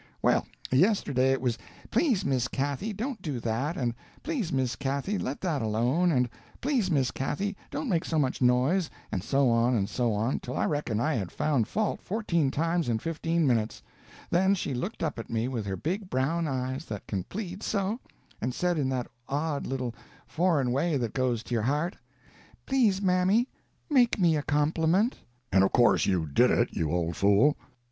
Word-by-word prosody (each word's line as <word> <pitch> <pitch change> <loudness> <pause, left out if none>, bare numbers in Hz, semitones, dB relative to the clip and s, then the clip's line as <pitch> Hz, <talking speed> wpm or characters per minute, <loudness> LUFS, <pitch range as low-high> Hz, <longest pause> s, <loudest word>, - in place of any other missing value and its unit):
Well, - - +3 0.2
yesterday 135 - +3
it 135 - 0
was 120 -2 -1 0.3
'Please, 240 - +2
Miss 130 -3 +1
Cathy, 145 - -2
don't 230 +4 -4
do 145 -6 -3
that'; 120 +8 -2
and, 120 -3 0 0.3
'Please, 275 - -2
Miss 130 -2 0
Cathy, 140 +9 -2
let 135 - -3
that 165 -8 0
alone'; 120 +11 +2
and, 125 -4 +2 0.3
'Please, 255 -8 +1
Miss 135 -6 +2
Cathy, 195 +10 -2
don't - - -3
make 170 -7 +1
so 160 - -1
much 135 -4 0
noise'; 130 +8 +3 0.2
and 95 - -2
so 135 0 +3
on 115 +2 +3
and 100 -3 +1
so 120 +3 0
on, 110 +5 0
till 125 - -5
I - - +1
reckon 145 -8 -1
I 155 +6 +1
had 95 -9 -2
found 135 -8 +1
fault 215 - -1
fourteen 180 -8 0
times 165 +1 0
in 115 - +2
fifteen 165 +4 -1
minutes; 115 -5 0 0.5
then 190 +3 +4
she 150 -7 -3
looked 175 - -4
up 150 -7 -2
at 115 - -7
me 115 +1 0
with 115 -6 -3
her 95 -1 -2
big 185 +5 -3
brown 155 +6 0
eyes 130 +2 -3
that 105 -2 -6
can 95 -3 -3
plead 195 -1 -6
so, 205 +2 -1 0.4
and 125 +2 -2
said 175 -2 +1
in 135 -2 0
that 130 -2 -1 0.2
odd 145 +1 -1
little 130 -3 -3 0.3
foreign 160 -7 +1
way 145 +4 +1
that 120 -4 -2
goes 125 -4 0
to 125 - -6
your 115 - +2
heart, 150 - 0 0.7
"'Please, 220 -8 +2
mammy, 190 +6 +3 0.4
make 255 -6 +4
me 170 -5 +4
a 150 - 0
compliment." 160 - +2 0.3
"And 95 0 +5
of 95 - +2
course 120 -1 +4
you 90 -5 +1
did 70 -2 +3
it, - - +2
you 80 - -1
old 85 -1 -1
fool?" 100 +9 +4
140 Hz, 185 wpm, -28 LUFS, 120-180 Hz, 0.7 s, And